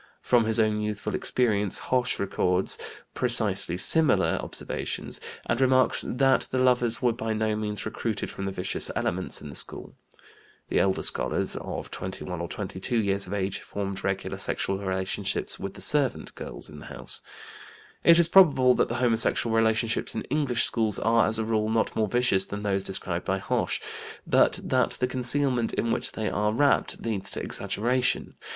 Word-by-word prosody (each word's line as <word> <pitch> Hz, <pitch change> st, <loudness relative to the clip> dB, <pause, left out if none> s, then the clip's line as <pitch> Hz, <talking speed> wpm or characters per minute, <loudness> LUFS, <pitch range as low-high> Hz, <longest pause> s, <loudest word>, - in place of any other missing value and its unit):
From 120 Hz, -2 st, +3 dB
his 110 Hz, +1 st, +3 dB
own 110 Hz, -1 st, +2 dB
youthful 105 Hz, -1 st, -3 dB
experience 105 Hz, -6 st, +1 dB
Hoche 125 Hz, -1 st, 0 dB
records 95 Hz, -1 st, 0 dB, 0.3 s
precisely 110 Hz, -8 st, +3 dB
similar 160 Hz, -, +3 dB
observations, -, -, -4 dB, 0.2 s
and 120 Hz, -, -1 dB
remarks 130 Hz, -1 st, +3 dB
that 135 Hz, +1 st, +2 dB
the 130 Hz, -, -2 dB
lovers 125 Hz, -2 st, +2 dB
were 120 Hz, -2 st, +3 dB
by 110 Hz, -1 st, -3 dB
no 110 Hz, 0 st, 0 dB
means 105 Hz, -1 st, -3 dB
recruited 110 Hz, 0 st, -3 dB
from 100 Hz, -, -6 dB
the -, -, -2 dB
vicious 90 Hz, -1 st, -2 dB
elements -, -, -2 dB
in 75 Hz, -, -8 dB
the 70 Hz, -, -9 dB
school. -, -, -2 dB, 0.8 s
(The -, -, +1 dB
elder 95 Hz, -1 st, +1 dB
scholars, -, -, -1 dB
of -, -, -6 dB
21 90 Hz, -1 st, -6 dB
or 85 Hz, -, -3 dB
22 95 Hz, +5 st, -3 dB
years 100 Hz, -2 st, 0 dB
of -, -, -6 dB
age, 100 Hz, -1 st, -2 dB
formed 100 Hz, -1 st, -5 dB
regular 95 Hz, 0 st, -3 dB
sexual 95 Hz, 0 st, -1 dB
relationships 95 Hz, -1 st, -2 dB
with 95 Hz, 0 st, -6 dB
the -, -, -10 dB
servant 145 Hz, -4 st, +2 dB
girls -, -, -7 dB
in 75 Hz, -1 st, -11 dB
the -, -, -11 dB
house.) -, -, -5 dB, 0.8 s
It 170 Hz, 0 st, +7 dB
is 170 Hz, -1 st, +5 dB
probable 145 Hz, -9 st, +6 dB
that -, -, +1 dB
the -, -, -3 dB
homosexual 115 Hz, 0 st, +2 dB
relationships 115 Hz, 0 st, +1 dB
in 110 Hz, -, -3 dB
English 135 Hz, -6 st, +1 dB
schools 110 Hz, -4 st, +1 dB
are, 115 Hz, 0 st, +3 dB
as 110 Hz, +1 st, +3 dB
a 110 Hz, -, -1 dB
rule, 110 Hz, -1 st, 0 dB
not 110 Hz, 0 st, 0 dB
more 110 Hz, -1 st, +1 dB
vicious 120 Hz, -4 st, +2 dB
than 105 Hz, +1 st, -6 dB
those 100 Hz, -2 st, 0 dB
described 90 Hz, -2 st, -2 dB
by 95 Hz, -, 0 dB
Hoche, -, -, -1 dB, 0.5 s
but -, -, +3 dB
that -, -, +1 dB
the -, -, +2 dB
concealment 125 Hz, -1 st, -1 dB
in 115 Hz, -, 0 dB
which -, -, 0 dB
they 110 Hz, -, -3 dB
are 105 Hz, +1 st, 0 dB
wrapped 140 Hz, +5 st, +1 dB
leads 110 Hz, -4 st, -2 dB
to -, -, -3 dB
exaggeration. 125 Hz, +4 st, -1 dB
110 Hz, 170 wpm, -26 LUFS, 100-125 Hz, 0.8 s, It